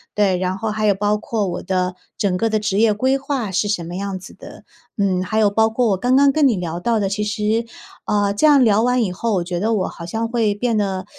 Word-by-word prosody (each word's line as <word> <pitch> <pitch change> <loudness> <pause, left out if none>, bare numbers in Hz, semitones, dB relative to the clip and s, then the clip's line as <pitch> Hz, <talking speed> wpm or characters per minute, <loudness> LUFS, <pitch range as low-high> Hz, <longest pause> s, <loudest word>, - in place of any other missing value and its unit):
对， 200 -3 +2
然 185 +1 -2
后 220 +1 -3
还 215 0 -2
有 200 - +3
包 205 +2 0
括 210 -1 -2
我 175 - -4
的 185 -1 -1 0.2
整 195 -3 0
个 225 +4 0
的 215 0 +1
职 210 -1 -1
业 225 0 +4
规 260 +6 +1
划 270 -6 -3
是 190 +3 0
什 200 -4 -1
么 175 - -7
样 195 0 -4
子 185 - -12
的。 - - -13 0.3
嗯， 185 -2 +1
还 215 +4 -1
有 210 -2 +4
包 220 +2 +2
括 235 +1 0
我 195 - +1
刚 250 +6 +1
刚 280 +1 +5
跟 290 0 +3
你 235 - +2
聊 175 -1 -4
到 225 +4 0
的 200 - 0
其 210 +1 -2
实， 215 +2 -1 0.4
呃， 205 -1 +1
这 205 - +1
样 290 -3 +6
聊 215 -2 +3
完 250 0 +2
以 195 -5 0
后， 225 +5 -2
我 180 - 0
觉 175 0 -4
得 225 +3 0
我 195 -4 0
好 170 - -9
像 225 +6 -3
会 225 -3 0
变 230 +3 -1
得 190 -3 -2
210 Hz, 285 characters per minute, -20 LUFS, 190-225 Hz, 0.4 s, 样